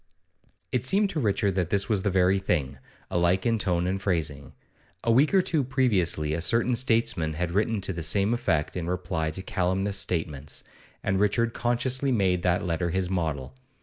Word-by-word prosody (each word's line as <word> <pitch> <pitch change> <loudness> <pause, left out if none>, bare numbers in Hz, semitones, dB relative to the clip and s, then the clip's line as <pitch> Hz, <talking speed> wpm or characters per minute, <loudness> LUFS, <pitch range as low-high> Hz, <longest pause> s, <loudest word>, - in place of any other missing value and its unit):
It 125 - 0
seemed 195 +8 +2
to 160 - -2
Richard 100 -4 +1
that 90 -3 -1
this 100 +1 +1
was 105 -4 +1
the 105 - 0
very 95 +1 +3
thing, 75 -8 -1 0.3
alike 85 +2 +2
in 115 -2 +2
tone 90 -4 0
and 95 +1 -1
phrasing. 75 -7 -2 0.5
A 115 - +2
week 135 +6 +4
or 190 -2 +4
two 155 -5 0
previously 100 - +1
a 80 - -2
certain 115 +7 +1
statesman 115 -10 +1
had 85 +1 -2
written 105 +2 0
to 95 - -2
the 85 - -5
same 100 +7 +2
effect 80 -10 0
in 85 -2 -3
reply 85 -3 -2
to 95 +5 -6
calumnious 95 +2 -1
statements, 75 -6 -3 0.4
and 95 0 0
Richard 115 +3 +1
consciously 125 +3 0
made 95 -6 +2
that 90 +2 +1
letter 85 0 -1
his 95 +1 -1
model. 75 -8 -2
95 Hz, 180 wpm, -26 LUFS, 85-115 Hz, 0.5 s, week